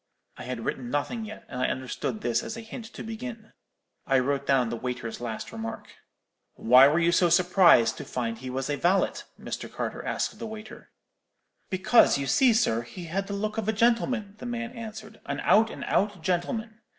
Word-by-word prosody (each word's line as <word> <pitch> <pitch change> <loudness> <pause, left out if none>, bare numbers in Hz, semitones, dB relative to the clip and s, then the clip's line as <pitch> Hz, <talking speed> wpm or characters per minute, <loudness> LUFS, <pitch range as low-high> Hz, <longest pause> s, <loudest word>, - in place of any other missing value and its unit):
"'I - - -8
had 125 -2 -5
written 125 -2 -3
nothing 180 - -2
yet, 215 0 -9
and 125 - -5
I - - +2
understood 130 - -3
this 120 -1 +1
as 220 - -6
a - - -6
hint 225 +1 -8
to - - -9
begin. 225 0 -7 0.5
I 135 - +4
wrote 140 +2 0
down 130 -4 +3
the 120 - -3
waiter's 120 -1 -5
last 115 -2 -5
remark. 115 0 -7 0.6
"'Why 125 +3 +7
were 150 +3 +2
you 170 0 +3
so 175 0 +4
surprised 175 - +5
to - - -6
find 115 -3 -3
he 130 +1 -6
was 130 +1 -3
a 145 -1 -1
valet?' 185 +5 +1 0.2
Mr. - - -6
Carter - - -4
asked - - -2
of - - -19
the 230 - -5
waiter. 220 +1 -10 0.8
"'Because, 190 -1 +4
you 140 - -2
see, 240 - +4
sir, 215 - +2
he 120 +10 -9
had 195 +4 -3
the 200 - -4
look 215 +2 -2
of 215 - -4
a - - +2
gentleman,' 230 -1 +1
the 245 - -6
man 240 0 -4
answered; 220 -2 -9
'an - - -3
out 220 +2 +4
and - - -7
out 200 -4 0
gentleman. 215 +5 -2
185 Hz, 200 wpm, -27 LUFS, -, 0.8 s, Why